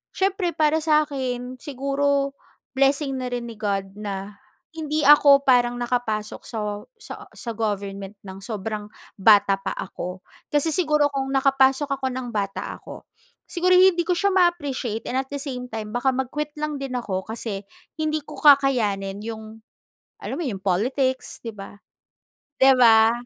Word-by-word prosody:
siyempre 380 Hz, -3 st, 0 dB
para 310 Hz, 0 st, +3 dB
sa'kin 260 Hz, -5 st, 0 dB
siguro 275 Hz, 0 st, 0 dB, 0.4 s
blessing 275 Hz, 0 st, +2 dB
na 255 Hz, -, -3 dB
rin 240 Hz, -1 st, -3 dB
ni -, -, -7 dB
God 195 Hz, -2 st, -2 dB
na 200 Hz, 0 st, -6 dB, 0.4 s
hindi 305 Hz, -1 st, -1 dB
ako 285 Hz, -1 st, +7 dB
parang 245 Hz, -1 st, +3 dB
nakapasok 235 Hz, -3 st, -2 dB
sa 210 Hz, -2 st, -4 dB, 0.2 s
sa -, -, -9 dB
sa 235 Hz, -, -6 dB
government 200 Hz, -2 st, -3 dB
nang 190 Hz, 0 st, -9 dB
sobrang 215 Hz, -1 st, -4 dB, 0.3 s
bata 200 Hz, -1 st, +5 dB
pa -, -, -3 dB
ako. 180 Hz, 0 st, -6 dB, 0.3 s
Kasi 295 Hz, +2 st, +2 dB
siguro 300 Hz, -4 st, +2 dB
kung 270 Hz, -1 st, -2 dB
nakapasok 270 Hz, +1 st, +3 dB
ako 265 Hz, -, -1 dB
ng 255 Hz, -2 st, -5 dB
bata 200 Hz, -2 st, -3 dB
ako, -, -, -12 dB, 0.4 s
siguro 365 Hz, +1 st, +2 dB
hindi 365 Hz, -1 st, +5 dB
ko 360 Hz, -, +1 dB
siya 400 Hz, +2 st, +2 dB
ma-appreciate 285 Hz, -, 0 dB
and 255 Hz, -, -1 dB
at 265 Hz, -, -13 dB
the 285 Hz, -, -3 dB
same 250 Hz, -3 st, -5 dB
time 215 Hz, -1 st, -5 dB
baka 260 Hz, +2 st, +1 dB
mag-quit 295 Hz, +3 st, -3 dB
lang 300 Hz, -1 st, -2 dB
din 270 Hz, -2 st, -4 dB
ako 190 Hz, -6 st, -3 dB
kasi 220 Hz, -3 st, -5 dB, 0.4 s
hindi 310 Hz, 0 st, 0 dB
ko -, -, -10 dB
kakayanin 220 Hz, -9 st, +3 dB
'yong, 220 Hz, 0 st, -8 dB, 0.6 s
alam -, -, -4 dB
mo -, -, -2 dB
'yong 195 Hz, -7 st, -4 dB
politics, 260 Hz, +8 st, 0 dB
'di 230 Hz, -, -6 dB
ba. 195 Hz, 0 st, -10 dB, 0.8 s
'Di 270 Hz, 0 st, +6 dB
ba? 225 Hz, -2 st, +6 dB
255 Hz, 150 wpm, -23 LUFS, 210-285 Hz, 0.8 s, ako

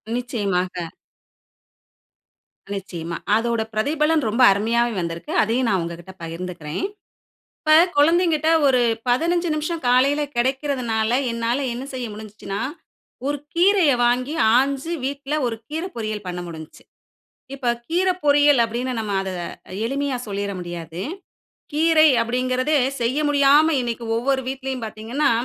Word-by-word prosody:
நிச்சயமாக. 185 Hz, -8 st, -2 dB, 1.9 s
நிச்சயமா, 170 Hz, -4 st, -5 dB, 0.2 s
அதோட 230 Hz, 0 st, 0 dB
பிரதிபலன் 300 Hz, +6 st, +1 dB
ரொம்ப 230 Hz, +4 st, 0 dB
அருமையாவே 230 Hz, +4 st, +1 dB
வந்திருக்கு. 170 Hz, 0 st, -5 dB
அதையும் 235 Hz, +3 st, 0 dB
நான் 190 Hz, -3 st, +1 dB
உங்ககிட்ட 170 Hz, +2 st, -8 dB
பகிர்ந்துக்கிறேன். 165 Hz, -, -5 dB, 0.8 s
இப்ப 310 Hz, -1 st, +3 dB, 0.2 s
குழந்தைங்கிட்ட 320 Hz, 0 st, +3 dB, 0.2 s
ஒரு 255 Hz, -2 st, +4 dB, 0.3 s
15 340 Hz, +7 st, +1 dB
நிமிஷம் 310 Hz, 0 st, -3 dB
காலையில 275 Hz, +4 st, +3 dB
கெடைக்கிறதுனால, 245 Hz, -3 st, 0 dB, 0.2 s
என்னால 230 Hz, +2 st, -1 dB, 0.2 s
என்ன 245 Hz, +3 st, -5 dB
செய்ய 255 Hz, -1 st, -3 dB
முடிஞ்சுச்சுனா, 210 Hz, -2 st, -7 dB, 0.7 s
ஒரு 290 Hz, 0 st, 0 dB, 0.2 s
கீரைய 360 Hz, -3 st, +4 dB
வாங்கி, 250 Hz, +5 st, +1 dB, 0.2 s
ஆஞ்சு 275 Hz, +4 st, 0 dB
வீட்ல 280 Hz, +1 st, -4 dB
ஒரு 230 Hz, -, -3 dB
கீரைப்பொரியல் 230 Hz, -, -4 dB
பண்ண 180 Hz, 0 st, -4 dB
முடிஞ்ச்சு. 160 Hz, -2 st, -10 dB, 0.7 s
இப்ப 255 Hz, -3 st, -1 dB, 0.2 s
"கீரைப்பொரியல்" 295 Hz, -6 st, +3 dB
அப்டீன்னு 245 Hz, +3 st, -3 dB
நம்ம 215 Hz, -2 st, -3 dB
அத 195 Hz, -, -4 dB, 0.6 s
எளிமையா 275 Hz, +2 st, -1 dB
சொல்லிற 200 Hz, 0 st, -3 dB
முடியாது. 170 Hz, 0 st, -6 dB, 0.7 s
"கீரை" 315 Hz, +1 st, +5 dB
அப்டீங்குறதே 255 Hz, +4 st, 0 dB, 0.3 s
செய்ய 255 Hz, +5 st, 0 dB
முடியாம, 290 Hz, +2 st, +5 dB
இன்னக்கி 235 Hz, -1 st, -3 dB
ஒவ்வொரு 265 Hz, +3 st, 0 dB
வீட்லயும் 265 Hz, -2 st, -4 dB
பாத்தீங்கன்னா, 220 Hz, +7 st, -1 dB
250 Hz, 110 wpm, -22 LUFS, 210-290 Hz, 1.9 s, கீரை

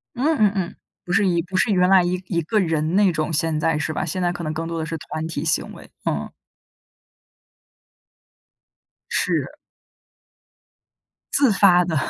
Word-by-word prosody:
嗯 295 Hz, +5 st, +1 dB
嗯 210 Hz, -4 st, +4 dB
嗯， 185 Hz, -3 st, -3 dB, 0.3 s
不 175 Hz, -, -7 dB
是 200 Hz, +3 st, +3 dB
一 170 Hz, -2 st, +2 dB
不 185 Hz, +2 st, -4 dB
是 210 Hz, -, +2 dB
原 180 Hz, -2 st, +3 dB
来 190 Hz, -2 st, +6 dB
一 180 Hz, +1 st, -1 dB
一 170 Hz, -3 st, 0 dB
个 215 Hz, +7 st, +1 dB
人 160 Hz, -2 st, 0 dB
那 200 Hz, -2 st, +4 dB
种， 155 Hz, 0 st, -2 dB
现 160 Hz, 0 st, 0 dB
在 160 Hz, 0 st, +1 dB
是 155 Hz, -, -2 dB
吧？ 155 Hz, -, -2 dB
现 185 Hz, +3 st, -3 dB
在 175 Hz, -1 st, +1 dB
可 175 Hz, -1 st, -6 dB
能 155 Hz, -1 st, -3 dB
更 165 Hz, +1 st, -4 dB
多 165 Hz, 0 st, -4 dB
的 160 Hz, -, -2 dB
是 165 Hz, 0 st, -4 dB
团 155 Hz, +2 st, -5 dB
体 155 Hz, -3 st, -4 dB
行 160 Hz, 0 st, -1 dB
为， -, -, -13 dB, 0.2 s
嗯。 -, -, -2 dB, 2.8 s
是。 -, -, -1 dB, 1.8 s
自 275 Hz, -4 st, +4 dB
发 185 Hz, -3 st, +5 dB
的， 170 Hz, -2 st, -2 dB
175 Hz, 185 characters per minute, -22 LUFS, 160-190 Hz, 2.8 s, 来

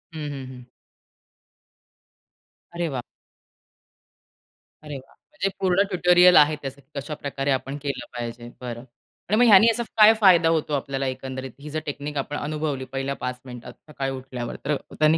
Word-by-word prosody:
हं, -, -, -5 dB
हं, 135 Hz, -2 st, -6 dB
हं. 125 Hz, -1 st, -11 dB, 2.1 s
अरे 170 Hz, -1 st, -1 dB
वाह! 130 Hz, -3 st, -3 dB, 1.8 s
अरे 150 Hz, -2 st, -6 dB
वाह! 135 Hz, 0 st, -15 dB, 0.2 s
म्हणजे 300 Hz, -10 st, -2 dB
पूर्ण 185 Hz, 0 st, +3 dB
ट्युटोरियल 180 Hz, -1 st, +5 dB
आहे 150 Hz, +1 st, +6 dB
त्याचं 135 Hz, 0 st, -7 dB
कशाप्रकारे 140 Hz, -1 st, -3 dB
आपण 135 Hz, +2 st, -2 dB
केलं 140 Hz, -4 st, -4 dB
पाहिजे. 120 Hz, 0 st, -6 dB
बरं 120 Hz, -1 st, -6 dB, 0.5 s
आणि 215 Hz, -, +3 dB
मग 245 Hz, -, +6 dB
ह्यांनी 215 Hz, 0 st, +8 dB
असा 235 Hz, +1 st, -2 dB
काय 215 Hz, +1 st, +9 dB
फायदा 175 Hz, -4 st, +6 dB
होतो 155 Hz, -2 st, 0 dB
आपल्याला 135 Hz, -1 st, -2 dB
एकंदरीत 130 Hz, 0 st, -5 dB
ही 150 Hz, -, -8 dB
जर 155 Hz, +1 st, -2 dB
टेक्निक 145 Hz, 0 st, -5 dB
आपण 145 Hz, +2 st, -3 dB
अनुभवली 150 Hz, -3 st, -3 dB
पहिल्या 135 Hz, +1 st, -2 dB
5 125 Hz, 0 st, -5 dB
मिनिटात 125 Hz, -1 st, -9 dB, 0.2 s
सकाळी 135 Hz, -2 st, -3 dB
उठल्यावर 130 Hz, -2 st, -6 dB
तर 150 Hz, -, +1 dB, 0.2 s
त्यांनी 155 Hz, +1 st, +5 dB
140 Hz, 150 wpm, -24 LUFS, 130-160 Hz, 2.1 s, काय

